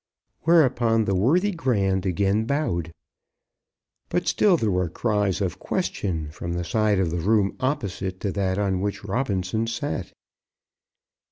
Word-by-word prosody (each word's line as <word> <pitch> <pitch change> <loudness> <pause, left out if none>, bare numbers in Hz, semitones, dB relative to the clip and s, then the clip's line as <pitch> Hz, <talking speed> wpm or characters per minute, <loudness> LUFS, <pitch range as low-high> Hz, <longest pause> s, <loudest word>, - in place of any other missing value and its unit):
'" - - -51
Whereupon 120 -9 +4
the 100 - 0
worthy 160 - +3
Grand 100 - 0
again 100 +4 +1
bowed. 95 - -1 1.2
But 175 -1 -1
still 175 +3 +4
there 110 -8 0
were 90 -2 0
cries 105 -1 0
of 90 -4 -2
question 80 -6 -2
from 85 +2 -5
the 90 0 -2
side 105 +3 +2
of 90 -3 +1
the 85 - -1
room 100 +1 +2
opposite 100 -9 -2
to 100 - -1
that 95 -1 -1
on 95 -2 0
which 100 +1 -3
Robinson 100 -1 -1
sat. 115 -4 -3
100 Hz, 145 wpm, -24 LUFS, 95-120 Hz, 1.2 s, Whereupon